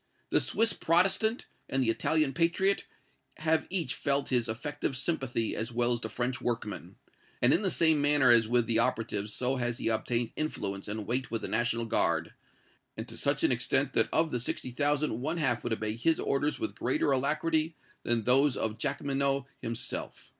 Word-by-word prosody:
The - - +5
Swiss 225 +1 +1
Protestant 195 +7 +2 0.2
and 135 0 +1
the 115 - +2
Italian 155 +4 +1
patriot 175 +6 +1 0.5
have 160 0 +1
each 170 -9 -1
felt 140 0 -1
his 120 -3 +1
effective 130 +3 -3
sympathy 130 -6 -1
as 110 +2 -3
well 120 +1 +1
as 120 - -3
the 110 - -4
French 125 +3 -2
workman; 115 -4 -4 0.4
and 120 - +5
in - - +2
the 195 - 0
same 160 -4 +3
manner 145 -3 +5
as 115 -2 +6
with 120 0 +2
the 115 0 +2
operatives 110 -4 -1
so 130 +4 -1
has 120 -1 -2
he - - -1
obtained 115 +1 -1
influence 100 -11 -3
and 105 0 -4
weight 125 +1 -2
with 115 -1 -3
the - - -2
National 115 +1 0
Guard, 115 - +1 0.6
and - - -5
to - - -9
such - - -1
an - - +4
extent - - +2
that - - +3
of 160 0 +2
the 125 - -1
sixty 125 +1 -3
thousand 145 -2 0
one 155 +5 -2
half 125 -7 0
would 120 - -1
obey 110 -1 -2
his 160 +8 +1
orders 145 +2 0
with 110 - -2
greater 130 +3 0
alacrity 155 +4 0 0.3
than 120 -2 0
those 135 +4 +3
of 110 0 -2
Jacqueminot 140 -1 -1 0.2
himself. 115 0 -5
130 Hz, 185 wpm, -30 LUFS, 115-150 Hz, 0.6 s, as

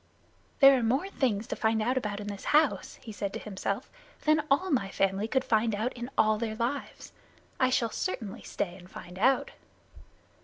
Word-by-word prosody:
"There 275 0 +9
are - - -2
more 260 +11 +1
things 225 - 0
to - - -4
find 220 0 +1
out 240 +4 +1
about 210 -5 -2
in 205 - -6
this 205 -1 -6
house," 300 -1 +2
he 225 - -8
said 205 -1 -3
to - - -4
himself, 200 +3 -4 0.3
"than 310 0 +3
all 350 +7 +2
my 195 -9 +1
family 195 +2 0
could 260 +3 +1
find 220 -1 +2
out 225 +5 -2
in 240 +1 -6
all 215 -1 +3
their 220 -1 -2
lives. 245 +5 -4 0.5
I 255 - +4
shall 235 -3 +1
certainly 225 - -4
stay 175 -2 -4
and 180 -1 -15
find 180 0 -10
out." 265 +5 +3
225 Hz, 190 wpm, -29 LUFS, 205-260 Hz, 0.5 s, There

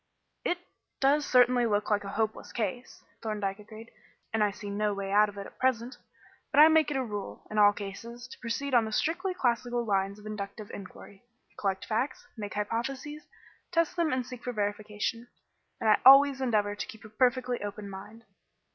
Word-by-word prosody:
"It 350 - 0 0.4
does 285 +2 +3
certainly 245 -1 +5
look 210 0 0
like 205 0 +2
a 200 - -6
hopeless 220 +1 -2
case," 235 +2 -4 0.2
Thorndyke 210 -2 -3
agreed, 215 +2 -12 0.4
"and 220 -1 +3
I 210 - +3
see 205 +1 -8
no 205 0 -1
way 195 -1 -4
out 210 +1 +5
of 205 - -12
it 200 - -5
at - - -14
present. 250 -1 0 0.5
But - - +2
I 310 +1 +10
make 315 -2 +4
it 295 - -1
a 265 - 0
rule, 205 -4 -6
in 215 - 0
all 205 0 +8
cases, 230 +5 -8
to - - -12
proceed 260 +4 -3
on 235 -2 +5
the 220 - -5
strictly 360 - 0
classical 240 -4 0
lines 195 -1 0
of 210 - -15
inductive 210 0 -6
inquiry 195 0 -11 0.3
collect 195 -2 -2
facts, 235 +5 -2
make 210 -3 -6
hypotheses, 260 +8 -3 0.4
test 335 0 +1
them 335 -3 +1
and 255 -1 0
seek 250 -1 -9
for 245 - -3
verification. 210 +2 -3 0.5
And 225 - -1
I 215 - +5
always 275 +1 +8
endeavour 210 -5 +1
to 205 - -5
keep 220 0 -12
a - - -10
perfectly 250 +2 +1
open 205 0 -5
mind. 200 +4 -10
225 Hz, 190 wpm, -29 LUFS, 205-255 Hz, 0.5 s, I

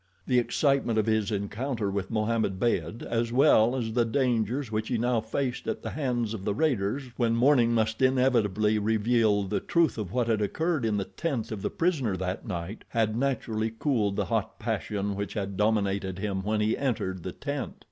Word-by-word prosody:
The 125 - +3
excitement 135 -2 +1
of 110 - +2
his 110 -2 +1
encounter 105 +2 -2
with 100 -1 -3
Mohammed 110 -3 0
Beyd, 120 0 -1
as 115 0 -1
well 125 -2 +5
as 115 -4 -2
the 120 0 +3
dangers 120 0 0
which 110 0 -1
he 125 - 0
now 120 0 +1
faced 125 +3 -3
at - - -3
the - - -4
hands 120 -6 -1
of 105 -4 -6
the 100 0 -1
raiders 130 -3 0
when 115 -2 +2
morning 120 -1 +4
must 110 +1 0
inevitably 115 -5 +3
reveal 110 -1 +2
the 95 - -1
truth 165 -8 +1
of 100 -5 -4
what 125 +2 +1
had 110 -2 +1
occurred 155 - 0
in 105 -2 +1
the 100 - -1
tent 130 -10 -3
of 105 -3 -4
the - - -1
prisoner 140 - 0
that 95 +5 -4
night, 90 +1 -5
had 110 -2 0
naturally 115 -4 -1
cooled 110 -8 +1
the - - 0
hot - - -2
passion 100 -1 -2
which 100 +3 -4
had 100 -2 -3
dominated 100 -2 0
him 95 -1 -2
when 105 +2 0
he 110 +1 +2
entered 105 -9 -2
the 90 - -5
tent. 140 +3 -4
110 Hz, 190 wpm, -28 LUFS, 105-125 Hz, -, well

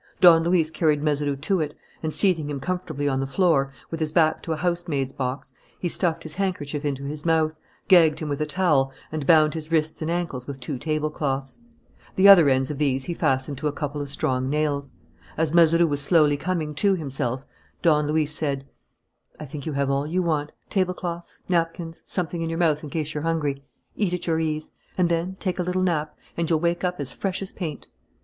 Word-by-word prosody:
Don 165 -3 +7
Luis 165 -2 +2
carried 155 -2 +1
Mazeroux 145 -2 0
to 160 +7 0
it, 150 -2 -3 0.2
and, 160 - -2
seating 165 -5 +1
him 145 -2 -3
comfortably 155 -3 -3
on 135 -1 +1
the 135 - -1
floor, 140 -4 +2 0.2
with 165 - -4
his 155 -1 0
back 155 -1 +3
to 165 - -5
a 160 - 0
housemaid's 165 -6 -1
box, 130 0 -4 0.2
he 180 - -2
stuffed 170 -1 0
his 155 - -5
handkerchief 160 -6 -2
into 140 -2 -2
his 145 +2 -5
mouth, 160 -2 +2 0.3
gagged 165 -5 +6
him 155 - -4
with 145 0 -2
a 150 - 0
towel, 150 -8 +2 0.2
and 155 -3 -4
bound 155 -2 +5
his 160 -1 -6
wrists 155 -1 0
and 155 - -2
ankles 165 -8 -3
with 140 -1 -6
two 130 +1 -5
tablecloths. 150 - -2 0.6
The 190 +1 +6
other 175 -7 +9
ends 130 +1 +2
of 145 - -6
these 135 -3 +1
he 175 - -3
fastened 130 -3 0
to 150 - -1
a - - 0
couple 145 0 -4
of 140 - -5
strong 130 -2 -1
nails. 145 -2 -1 0.5
As 160 -1 0
Mazeroux 170 0 +6
was 145 -3 0
slowly 150 -1 +4
coming 155 -1 -2
to 195 +6 +2
himself, 135 -5 -3 0.4
Don 150 -3 +4
Luis 150 0 +1
said: 140 -3 -2 0.7
"I 155 - -6
think 145 +2 -7
you 155 - -2
have 140 0 0
all 140 +2 0
you 180 +3 0
want. 150 -3 -1 0.2
Tablecloths 180 -3 -2
napkins 165 -1 -1
something 175 -2 -2
in 165 - -2
your 165 - -3
mouth 160 -3 +2
in 150 - -6
case 155 0 -3
you're 150 - -3
hungry. 150 -4 -1 0.3
Eat 185 -4 0
at 180 - -4
your 160 -1 +1
ease. 155 -1 -2 0.3
And 180 -2 +3
then 170 +3 -1
take 185 -2 -2
a - - +2
little 180 +1 0
nap, 155 -4 -1 0.2
and 170 -1 -1
you'll 160 -2 +3
wake 170 +2 0
up 180 -2 -1
as 135 -3 -3
fresh 195 +5 -3
as 190 - -5
paint." 160 -6 -6
155 Hz, 210 wpm, -24 LUFS, 145-170 Hz, 0.7 s, other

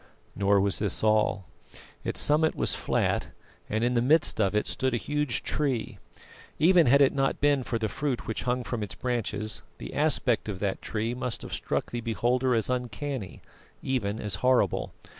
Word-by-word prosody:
Nor 100 0 +3
was 100 -1 0
this 105 -2 0
all. 105 -3 +2 0.6
Its - - -2
summit 155 +2 +3
was - - +2
flat, - - 0 0.4
and 110 +2 0
in 120 +1 +2
the 120 - +2
midst 145 -2 +3
of 100 0 +1
it 105 - +2
stood 130 -2 0
a - - +1
huge 150 0 -1
tree. 135 -7 -2 0.6
Even 170 0 +5
had 140 +3 +6
it 135 - +3
not 135 -1 0
been 145 -1 +3
for 120 -1 -2
the 110 -1 -1
fruit 135 +3 -3
which 110 - -3
hung 125 0 -1
from 120 -1 -4
its 105 - -4
branches, 110 -4 -2 0.2
the - - -8
aspect 135 -7 +1
of 100 - -3
that 95 0 -2
tree 115 +2 -2
must 125 -1 -4
have - - -7
struck - - -2
the 120 - -3
beholder 120 +2 +1
as 110 - 0
uncanny, 125 -2 -4 0.4
even 110 -5 -1
as 105 -2 -1
horrible. 125 -7 +2
120 Hz, 180 wpm, -27 LUFS, 110-135 Hz, 0.6 s, had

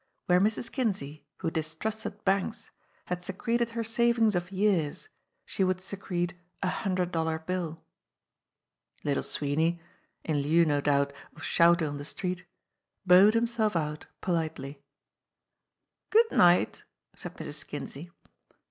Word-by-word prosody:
Where 180 0 +4
Mrs. 215 +3 0
Kinsey, 190 - -2
who 165 -3 -2
distrusted 200 +7 -4
banks, 195 +4 0 0.3
had 180 0 -3
secreted 230 +6 -1
her 230 - 0
savings 230 -1 +3
of 175 +1 -2
years, 195 - 0 0.4
she 195 - -1
would 185 -1 +1
secret 180 -3 -3 0.3
a 185 - +2
hundred 185 -2 -1
dollar 160 -1 0
bill. 165 -1 -4 1.2
Little 145 -1 +1
Sweeney 160 +4 +1 0.4
in 155 -2 0
lieu, 165 +4 +4
no 145 -2 +1
doubt, 140 -1 +2 0.2
of - - -11
shouting 170 -1 +4
on 145 0 -4
the - - -5
street 180 +3 -4 0.6
bowed 190 +4 +7
himself 230 -3 +1
out 150 -2 -2
politely. 155 -5 -2 1.3
"Good 450 +1 +4
night," 175 -9 +4 0.3
said - - -8
Mrs. - - -6
Kinsey. 160 +6 -7
180 Hz, 125 wpm, -29 LUFS, 160-205 Hz, 1.3 s, bowed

